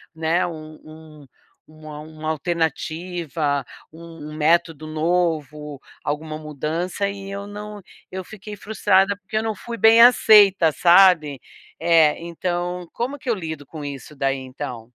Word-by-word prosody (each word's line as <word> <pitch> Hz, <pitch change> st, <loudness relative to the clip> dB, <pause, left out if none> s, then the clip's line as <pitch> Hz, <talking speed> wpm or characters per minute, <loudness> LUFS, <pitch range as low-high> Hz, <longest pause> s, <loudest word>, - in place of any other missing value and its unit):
né, 165 Hz, +3 st, +1 dB
um 155 Hz, -2 st, -9 dB
um 155 Hz, -2 st, -14 dB, 0.4 s
uma 155 Hz, -1 st, -11 dB
uma 155 Hz, 0 st, -7 dB
alternativa, 160 Hz, -2 st, -2 dB, 0.3 s
um 165 Hz, -2 st, -11 dB
método 160 Hz, 0 st, +1 dB
novo, 155 Hz, -3 st, -2 dB, 0.2 s
alguma 155 Hz, +1 st, -4 dB
mudança 160 Hz, +6 st, -3 dB
e 195 Hz, 0 st, -8 dB
eu 200 Hz, 0 st, -6 dB
não 210 Hz, 0 st, -8 dB, 0.3 s
eu 190 Hz, 0 st, -5 dB
fiquei 210 Hz, +1 st, -10 dB
frustrada, 200 Hz, -1 st, +1 dB
porque 205 Hz, +2 st, -10 dB
eu 220 Hz, -, 0 dB
não 220 Hz, -1 st, -2 dB
fui 235 Hz, +4 st, -7 dB
bem 225 Hz, +1 st, +6 dB
aceita, 205 Hz, -8 st, +6 dB
sabe. 170 Hz, -5 st, +5 dB, 0.4 s
É 165 Hz, -2 st, +4 dB
então, 175 Hz, +1 st, -3 dB
como 265 Hz, +5 st, -4 dB
que 265 Hz, -3 st, -6 dB
eu 230 Hz, -, +2 dB
lido 160 Hz, -6 st, -6 dB
com 155 Hz, 0 st, -9 dB
isso 140 Hz, +1 st, -8 dB
daí 135 Hz, 0 st, 0 dB
então? 130 Hz, -2 st, -7 dB
165 Hz, 135 wpm, -22 LUFS, 155-190 Hz, 0.4 s, bem